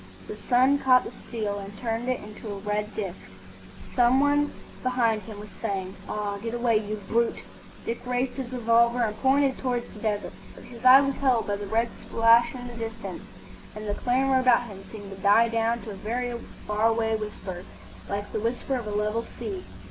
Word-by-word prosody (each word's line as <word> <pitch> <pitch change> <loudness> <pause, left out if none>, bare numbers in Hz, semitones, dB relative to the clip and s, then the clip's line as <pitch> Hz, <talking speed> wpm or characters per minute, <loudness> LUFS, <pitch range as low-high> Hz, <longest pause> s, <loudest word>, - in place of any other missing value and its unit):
The - - -6
sun 255 +6 +3
caught 255 -2 +5
the - - -7
steel 210 -4 -4
and 200 +1 -9
turned 230 +1 -2
it 255 - 0
into 210 +1 -9
a 200 - -4
red 210 +1 -2
disc. 195 -4 -4 0.7
Some 245 +1 +4
one 290 +1 +3 0.3
behind 240 -4 +1
him 205 +1 -9
was 210 0 -9
saying, 195 -3 -4
"Ah, 205 -1 -2
get 230 +1 -3
away, 235 -2 +3
you 210 0 -2
brute!" 235 +1 +1 0.4
Dick 230 - -3
raised 250 +1 0
his 255 -2 -5
revolver 235 0 +3
and 215 -2 -1
pointed 270 0 +3
towards 245 -2 -2
the 210 - -11
desert. 210 -1 -2 0.3
His 235 -1 -12
eye 255 +2 +9
was 275 -1 -1
held 255 -5 +2
by 205 -1 -1
the 205 0 -6
red 230 +3 +1
splash 230 +2 +3
in 245 -1 -7
the 240 - -8
distance, 225 -1 -6 0.5
and 215 0 -6
the 205 - 0
clamour 260 +4 +2
about 250 -1 +5
him 200 -5 -10
seemed 205 -3 -9
to 195 - -8
die 215 +3 +5
down 230 +1 0
to 220 - -6
a - - -7
very 240 +4 -2 0.3
far 210 +1 +2
away 225 -1 +1
whisper, 200 -4 -5 0.5
like 205 +1 -3
the - - -1
whisper 235 +4 -2
of 235 -3 -5
a - - -3
level 210 +2 0
sea. 210 -7 -6
230 Hz, 195 wpm, -26 LUFS, 210-245 Hz, 0.7 s, eye